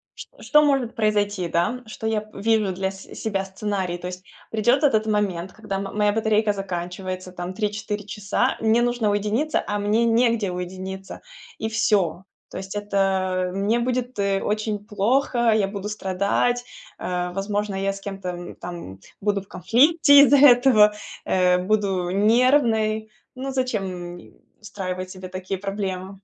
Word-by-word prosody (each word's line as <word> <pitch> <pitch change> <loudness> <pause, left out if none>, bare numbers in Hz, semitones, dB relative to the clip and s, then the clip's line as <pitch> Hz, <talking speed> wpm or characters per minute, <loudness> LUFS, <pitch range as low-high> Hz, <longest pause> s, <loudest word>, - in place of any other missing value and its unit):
ч - - -9
что 300 -1 +5
может 275 -5 +1
произойти, 205 -4 0
да, 175 +10 0
что 220 0 -6
я 215 -1 -2
вижу 215 -1 +1
для 190 +1 -2
с 190 0 -12
себя 195 -3 -2
сценарий. 190 -2 -3
То 180 - -7
есть 180 +1 -8 0.3
придёт 240 +6 +2
этот 220 -6 +3
момент, 195 -4 -1
когда 210 -3 -5
м 195 - -3
моя 210 -1 +3
батарейка 215 -1 +2
заканчивается 185 -1 -5
там 180 +1 -6
3-4 210 0 -3
часа, 210 +5 -1
мне 225 +2 +3
нужно 240 -3 +1
уединиться, 215 +9 0
а 205 0 -2
мне 215 +3 +2
негде 230 -3 +2
уединиться, 185 +2 -6 0.4
и 220 - -3
всё. 200 -6 +1 0.3
То - - -7
есть 190 +1 -7
это 190 -3 0
мне 205 +5 +1
будет, 250 0 -2
э, 195 -1 +1
очень 210 0 -1
плохо, 235 +3 +1
я 210 -3 +2
буду 200 0 -5
страдать, 210 +4 0 0.3
э, 180 0 -3
возможно, 205 +1 -2
я 195 +1 -1
с 195 - -10
кем-то, 195 -2 -5
м, 175 0 -7
там 170 - -8 0.2
буду 205 -1 0
в - - -25
конфликте 285 - +5
из-за 285 0 +6
этого, 245 -6 +6 0.3
э, 180 -1 +3
буду 195 -3 0
нервной. 220 0 +2 0.2
Ну, 265 +1 -4
зачем, 190 -9 -3
м, - - -15 0.3
устраивать 185 -3 -5
себе 185 -1 -8
такие 185 +1 -5
проблемы? 195 -1 -4
205 Hz, 155 wpm, -23 LUFS, 190-220 Hz, 0.4 s, из-за